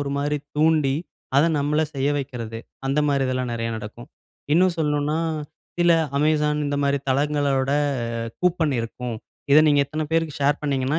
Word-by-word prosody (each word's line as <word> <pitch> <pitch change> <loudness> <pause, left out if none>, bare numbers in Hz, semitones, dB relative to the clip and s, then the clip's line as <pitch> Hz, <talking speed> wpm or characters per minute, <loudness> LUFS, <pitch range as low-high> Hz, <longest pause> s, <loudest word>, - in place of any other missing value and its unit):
ஒரு 140 -1 -3
மாரி 145 +1 0 0.2
தூண்டி, 155 -3 +3 0.4
அத 145 - +6
நம்மள 150 +2 +1
செய்ய 140 +1 0
வைக்கிறது. 120 -5 -5 0.3
அந்த 140 +2 0
மாதிரி 140 -1 +2
இதெல்லாம் 130 -1 -2
நெறைய 115 0 -2
நடக்கும். 110 +3 -9 0.4
இன்னும் 180 +1 +4
சொல்ணுனா, 150 0 0 0.6
சில 175 0 +4 0.3
Amazon 150 0 +2
இந்த 145 0 -1
மாரி 140 0 +2
தளங்களோட 140 -1 +1 0.5
ஆ - - -3 0.2
கூப்பன் 170 -5 +2
இருக்கும். 115 0 -5 0.4
இத 150 - +9
நீங்க 145 -1 +4
இத்தன 155 +2 -3
பேருக்கு 165 -2 0
ஷேர் 145 +1 +2
பண்ணீங்கன்னா, 140 +1 0
145 Hz, 155 wpm, -23 LUFS, 135-150 Hz, 0.6 s, இத